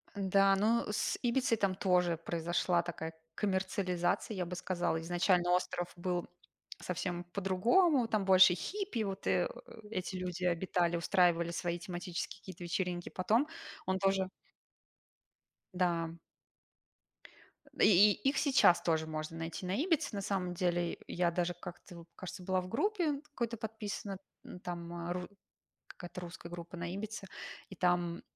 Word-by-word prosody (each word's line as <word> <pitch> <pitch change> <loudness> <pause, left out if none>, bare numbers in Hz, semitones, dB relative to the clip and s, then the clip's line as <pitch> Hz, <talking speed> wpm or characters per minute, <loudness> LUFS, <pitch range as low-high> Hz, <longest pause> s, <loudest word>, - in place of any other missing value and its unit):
Да, 195 0 +4
ну, 220 +4 +2
с 210 - 0
Ибицей 245 -1 +2
там 195 -3 +1
тоже 180 -3 +2
произошла 170 +1 0
такая 165 -1 -5 0.2
коммерциализация, 190 0 0
я 180 -2 -1
бы 180 +1 -5
сказала. 175 -2 -1
Изначально 175 +1 +2
остров 180 -1 0
был 175 0 -2 0.5
совсем 180 0 -3
по-другому, 225 - +3
там 215 -3 0
больше 190 -1 +8
хиппи, 385 - -3
вот, 195 -1 -4
э, - - +2 0.4
эти 185 -2 -3
люди 180 0 -3
обитали, 175 0 +1
устраивали 170 -1 +3
свои 170 0 -2
тематические 175 +1 -5
какие-то 185 -2 -10
вечеринки. 175 0 -2
Потом 220 +10 +2 0.4
он 190 0 +1
тоже 195 -1 +2 1.4
Да. 170 -2 +1 1.7
И 205 +1 +7
и 270 - 0
их 275 - -1
сейчас 270 - +5
тоже 160 -2 +1
можно 155 +1 -4
найти 165 +3 -5
на 185 +2 -1
Ибице 310 - +1
на 200 - -2
самом 190 -2 -1
деле. 175 -1 0
Я 175 -1 +1
даже 175 +1 0
как-то 175 +1 -10
в - - -20
кажется, 185 0 -7
была 185 0 +1
в 180 - -8
группе 305 - 0
какой-то 235 -6 -3
подписана, 210 -3 -5 0.5
там 170 -1 -5
ру 180 0 -3 0.6
какая-то 175 0 -8
русская 170 0 -8
группа 175 +1 -8
на 170 0 -4
Ибице, 210 0 -5 0.4
и 190 - -10
там 175 -1 +1
180 Hz, 140 wpm, -33 LUFS, 175-200 Hz, 1.7 s, больше